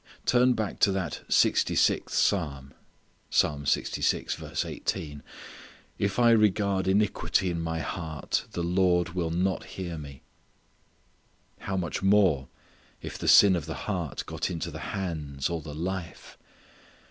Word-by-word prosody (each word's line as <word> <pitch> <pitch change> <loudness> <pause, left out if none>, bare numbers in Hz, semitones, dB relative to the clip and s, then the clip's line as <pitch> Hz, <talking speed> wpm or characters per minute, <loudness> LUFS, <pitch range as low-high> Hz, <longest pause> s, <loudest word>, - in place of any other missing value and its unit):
Turn 125 +1 +4
back 110 -4 -3
to 100 - +4
that 90 -5 -3
sixty - - +3
sixth - - +2
Psalm 70 -8 0 0.6
"if - - +5 2.7
I 120 -1 +5
regard 100 -3 +2
iniquity 95 -2 +1
in 85 -1 -3
my 80 0 -2
heart 80 -2 -3
the 85 - -2
Lord 90 0 +2
will 85 -1 -2
not 90 +3 0
hear 85 -4 -6
me." 70 -3 -10 1.4
How 95 -1 -3
much 85 -4 -3
more 95 -9 +3 0.6
if - - -6
the - - -4
sin 100 -2 +8
of 80 -3 -4
the 80 - -4
heart 90 - -3
get - - -3
into 85 -3 -4
the - - -7 0.2
hands 75 -6 -3
or 85 -1 -2
the 75 -1 -8
life! 90 +1 -5
90 Hz, 125 wpm, -27 LUFS, 80-95 Hz, 2.7 s, sin